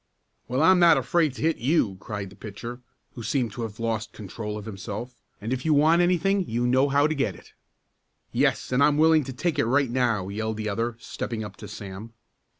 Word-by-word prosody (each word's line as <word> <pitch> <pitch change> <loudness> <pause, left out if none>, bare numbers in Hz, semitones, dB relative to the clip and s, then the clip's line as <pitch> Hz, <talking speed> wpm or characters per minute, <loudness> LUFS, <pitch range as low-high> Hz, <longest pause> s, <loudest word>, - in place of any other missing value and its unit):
"Well, 130 +4 +1
I'm 185 +2 +6
not 170 -3 +7
afraid 155 +2 +1
to - - -6
hit 160 0 +2
you!" 120 - +1
cried 100 -3 -6
the - - -14
pitcher, 115 +5 -8 0.3
who 120 - -8
seemed 120 0 -1
to 120 - -7
have 110 -1 -6
lost 115 -1 -2
control 105 +1 -6
of 105 - -8
himself. 110 +4 -7 0.2
"And 115 +5 -3
if 130 - -3
you 155 -2 +3
want 160 +4 +5
anything 180 +2 +2
you 120 +2 0
know 130 +3 +3
how 140 +1 +3
to 155 - +1
get 125 - -1
it." - - -17 0.8
"Yes, - - +1
and 130 +2 +3
I'm 145 0 +4
willing 160 0 +5
to 130 - -6
take 165 +6 -1
it - - +3
right 135 +1 +2
now," 120 -7 +1
yelled 110 +2 -3
the 110 -1 -2
other, 115 +3 -2
stepping 115 -1 -5
up 100 -2 -8
to - - -9
Sam. 100 +3 -8
120 Hz, 215 wpm, -25 LUFS, 110-145 Hz, 0.8 s, not